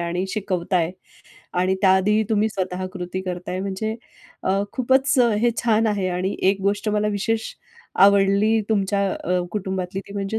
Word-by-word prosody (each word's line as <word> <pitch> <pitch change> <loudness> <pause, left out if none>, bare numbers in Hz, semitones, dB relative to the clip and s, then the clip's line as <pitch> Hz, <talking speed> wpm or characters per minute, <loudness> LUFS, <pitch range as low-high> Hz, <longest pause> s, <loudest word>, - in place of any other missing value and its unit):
आणि 170 +2 -2
शिकवताय. 185 -4 -1 0.6
आणि 185 +1 +1
त्या 190 - +6
आधीही 210 +3 +2
तुम्ही 215 0 +2
स्वतः 185 -2 -3
कृती 180 -1 -5
करताय, 180 0 -4
म्हणजे 200 +3 -3 0.5
अ, 195 +1 +1
खूपच 265 +2 +2 0.2
हे 240 - +3
छान 225 -1 +3
आहे. 200 -3 0
आणि 185 +2 -2 0.2
एक 195 0 -3
गोष्ट 205 +2 0
मला 210 0 +1
विशेष 220 +2 -1 0.5
आवडली 200 +2 +4
तुमच्या 200 -1 +1
अ, 180 +1 -1
कुटुंबातली. 190 -2 -3
ती - - -9
म्हणजे 200 +2 -2
195 Hz, 150 wpm, -22 LUFS, 185-215 Hz, 0.6 s, त्या